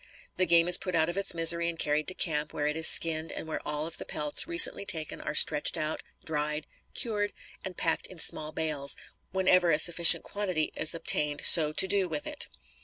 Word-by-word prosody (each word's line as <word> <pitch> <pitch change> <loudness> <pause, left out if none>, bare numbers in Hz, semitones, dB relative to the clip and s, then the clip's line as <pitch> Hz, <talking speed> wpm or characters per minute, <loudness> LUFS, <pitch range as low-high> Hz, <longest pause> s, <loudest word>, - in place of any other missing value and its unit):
The 185 - -1
game 170 0 +3
is 180 0 +6
put 185 -2 -6
out 160 0 -1
of 175 - -7
its 195 -3 -2
misery 170 +1 +2
and 170 - -9
carried 150 -1 -3
to 185 - +2
camp, 150 -3 -3
where 145 - -5
it 150 0 -4
is 160 0 +1
skinned, 160 -1 +4
and - - -9
where 160 - -7
all 150 0 -6
of 165 - -6
the - - -7
pelts 150 - -2
recently 340 - +3
taken 160 -6 -5
are 150 - -8
stretched 150 - +1
out, 155 +1 -5 0.2
dried, 150 -1 -5 0.3
cured, 205 -3 -3 0.3
and 185 -2 -9
packed 165 - -3
in 185 - -15
small 155 -1 0
bales, 150 -3 -2 0.3
whenever 185 -2 0
a 150 - 0
sufficient 170 +1 +7
quantity 185 -7 -5
is 160 +2 -2
obtained 150 -2 -3
so 155 -3 +7
to 190 - +2
do 195 -2 -1
with 150 -2 -7
it. - - -4
160 Hz, 210 wpm, -25 LUFS, 150-180 Hz, 0.3 s, sufficient